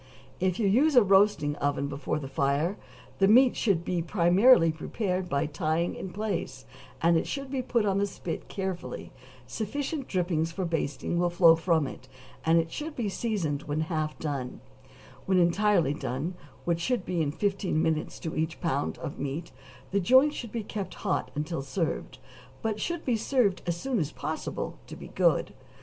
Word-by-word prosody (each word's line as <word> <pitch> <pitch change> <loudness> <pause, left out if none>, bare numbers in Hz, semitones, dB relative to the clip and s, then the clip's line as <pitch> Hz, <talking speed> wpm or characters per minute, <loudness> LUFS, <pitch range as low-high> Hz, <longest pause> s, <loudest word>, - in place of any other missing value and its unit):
If 185 0 +1
you 220 - +2
use 275 +9 +4
a 245 - +8
roasting 195 -7 +4
oven 140 0 0
before 140 +2 -3
the 145 -3 -5
fire, 140 +7 0 0.4
the 195 - +5
meat 250 +4 +6
should 185 -6 +1
be 180 -2 0
similarly 180 0 +6
prepared 185 +3 -3
by 140 0 +1
tying 155 +3 -1
in 190 - -6
place, 195 -10 -3 0.4
and 170 0 +5
it - - -1
should 275 -1 -4
be 270 -2 -1
put 235 -3 +1
on 195 -1 +1
the 200 - +1
spit 175 -3 -6
carefully; 190 -2 -5 0.3
sufficient 275 +5 -3
drippings 170 -3 0
for 185 +2 -3
basting 165 0 -2
will 175 0 +2
flow 170 -1 +6
from 165 -2 +1
it, 130 -1 -8 0.4
and 165 +1 +4
it 165 0 +1
should 305 +1 -5
be 225 -4 -1
seasoned 185 -9 -2
when 150 +1 -2
half 155 -1 -2
done; 140 -5 -4 0.7
when 190 -1 +3
entirely 175 -3 +3
done, 150 +3 -3 0.3
which 170 +4 0
will 250 - +3
be 180 -4 -2
in 145 -2 0
fifteen 195 0 0
minutes 160 -1 0
to 160 - -4
each 160 +1 -2
pound 145 -5 -1
of 155 - -6
meat, 145 +4 -4 0.4
the 200 - +2
joint 260 +9 +5
should 235 -4 -6
be 230 -2 -3
kept 200 -1 -5
hot - - 0
until 150 +1 -2
served, 160 +5 -3 0.5
but 215 -1 -1
should 345 -1 -3
be 245 - +2
served 225 -4 +1
as 170 -1 0
soon 260 -1 -1
as 150 -4 -1
possible - - -4
to - - -8
be - - -10
good. - - +2
175 Hz, 180 wpm, -28 LUFS, 160-210 Hz, 0.7 s, a